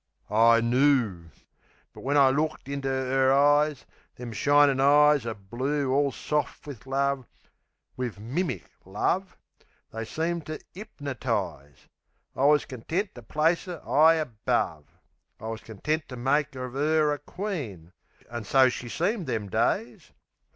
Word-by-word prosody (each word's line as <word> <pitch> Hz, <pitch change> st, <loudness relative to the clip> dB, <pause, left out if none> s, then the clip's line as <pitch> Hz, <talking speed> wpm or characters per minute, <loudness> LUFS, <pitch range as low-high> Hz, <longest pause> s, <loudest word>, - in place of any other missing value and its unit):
I 115 Hz, +2 st, +5 dB
knoo. 120 Hz, -7 st, +2 dB, 0.7 s
But -, -, -12 dB
when 145 Hz, +2 st, 0 dB
I 135 Hz, -2 st, +6 dB
looked 155 Hz, +1 st, -2 dB
into 140 Hz, -1 st, -3 dB
'er 130 Hz, 0 st, +1 dB
eyes 145 Hz, +1 st, +3 dB, 0.3 s
Them 120 Hz, -1 st, -7 dB
shinin' 145 Hz, +3 st, +4 dB
eyes 145 Hz, -1 st, +5 dB
o' 115 Hz, -, -3 dB
blue 130 Hz, +7 st, -2 dB
all 140 Hz, 0 st, +2 dB
soft 150 Hz, +2 st, -3 dB
wiv 130 Hz, -3 st, -10 dB
love 135 Hz, -1 st, -1 dB, 0.7 s
Wiv 125 Hz, -4 st, -4 dB
MIMIC 125 Hz, -, -3 dB, 0.2 s
love 175 Hz, -, -2 dB, 0.5 s
they 110 Hz, 0 st, -5 dB
seemed 165 Hz, +7 st, -3 dB
to 155 Hz, 0 st, -5 dB
'ipnertize. 115 Hz, -, -5 dB, 0.5 s
I 135 Hz, -, +1 dB
wus 150 Hz, 0 st, +4 dB
content 160 Hz, -, -3 dB
to 120 Hz, -, -11 dB
place 155 Hz, -, 0 dB
'er 175 Hz, -3 st, -6 dB
'igh 160 Hz, +3 st, +6 dB
above. 115 Hz, -, -2 dB, 0.5 s
I 110 Hz, -, -10 dB
wus 115 Hz, -1 st, -5 dB
content 150 Hz, +10 st, -3 dB
to 125 Hz, -, -7 dB
make 140 Hz, +3 st, 0 dB
of 125 Hz, -1 st, -6 dB
'er 150 Hz, +1 st, +2 dB
a 145 Hz, -, -5 dB
queen; 140 Hz, -, -6 dB, 0.3 s
An' 120 Hz, -1 st, -6 dB
so 130 Hz, +4 st, +4 dB
she 125 Hz, -1 st, -6 dB
seemed 180 Hz, -, -1 dB
them 110 Hz, -5 st, -3 dB
days... 115 Hz, +2 st, -1 dB
135 Hz, 140 wpm, -27 LUFS, 115-150 Hz, 0.7 s, I